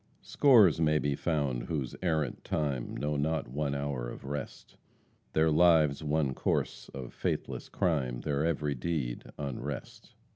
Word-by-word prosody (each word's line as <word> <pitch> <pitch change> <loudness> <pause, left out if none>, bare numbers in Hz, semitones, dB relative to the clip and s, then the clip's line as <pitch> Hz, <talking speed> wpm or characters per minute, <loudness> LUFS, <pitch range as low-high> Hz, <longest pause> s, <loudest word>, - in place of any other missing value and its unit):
"Scores 110 - +5
may 75 -1 +4
be 70 -1 0
found 70 -7 -1
whose 70 -6 -3
errant 80 -7 -1
time 70 -5 -2
Know 75 0 -1
not 80 +2 0
one 70 +2 -1
hour 70 -4 -3
of - - -9
rest; 70 -1 -6 0.6
Their 80 0 +3
lives 80 -3 +4
one 75 -3 +1
course - - -1
of 65 -3 -8
faithless - - -3
crime, 65 -8 0
Their 75 0 0
every 75 -3 0
deed 65 -3 -3
unrest." 70 -1 -6
75 Hz, 140 wpm, -30 LUFS, 70-80 Hz, 0.6 s, Scores